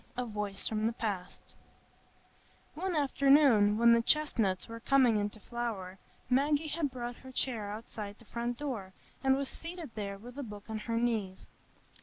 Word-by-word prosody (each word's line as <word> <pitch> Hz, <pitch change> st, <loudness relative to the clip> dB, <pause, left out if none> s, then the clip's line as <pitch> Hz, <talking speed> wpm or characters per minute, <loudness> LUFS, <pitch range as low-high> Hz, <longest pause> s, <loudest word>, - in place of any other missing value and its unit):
A 250 Hz, -, 0 dB
Voice 210 Hz, -3 st, -3 dB
from 215 Hz, 0 st, 0 dB
the 230 Hz, -, -1 dB
Past 195 Hz, -5 st, -5 dB, 1.2 s
One 365 Hz, +2 st, -2 dB
afternoon, 275 Hz, -7 st, +5 dB
when 235 Hz, +1 st, +7 dB
the 235 Hz, -, +5 dB
chestnuts 230 Hz, -10 st, +1 dB
were 230 Hz, 0 st, -7 dB
coming 250 Hz, -3 st, +4 dB
into 205 Hz, +1 st, -3 dB
flower, 205 Hz, -5 st, -4 dB, 0.3 s
Maggie 290 Hz, +4 st, +2 dB
had 300 Hz, -1 st, 0 dB
brought 245 Hz, -1 st, -5 dB
her 260 Hz, -, -11 dB
chair 235 Hz, -5 st, -1 dB
outside 210 Hz, -1 st, -6 dB
the 235 Hz, -, -18 dB
front 235 Hz, +2 st, -3 dB
door, 230 Hz, -10 st, -4 dB, 0.3 s
and 265 Hz, 0 st, +5 dB
was 275 Hz, 0 st, -1 dB
seated 330 Hz, -3 st, -6 dB
there 200 Hz, -2 st, -4 dB
with 245 Hz, +6 st, -10 dB
a -, -, -2 dB
book 210 Hz, -4 st, -8 dB
on 220 Hz, -, -2 dB
her 230 Hz, +2 st, -2 dB
knees. 220 Hz, -6 st, -1 dB
235 Hz, 165 wpm, -32 LUFS, 210-270 Hz, 1.2 s, when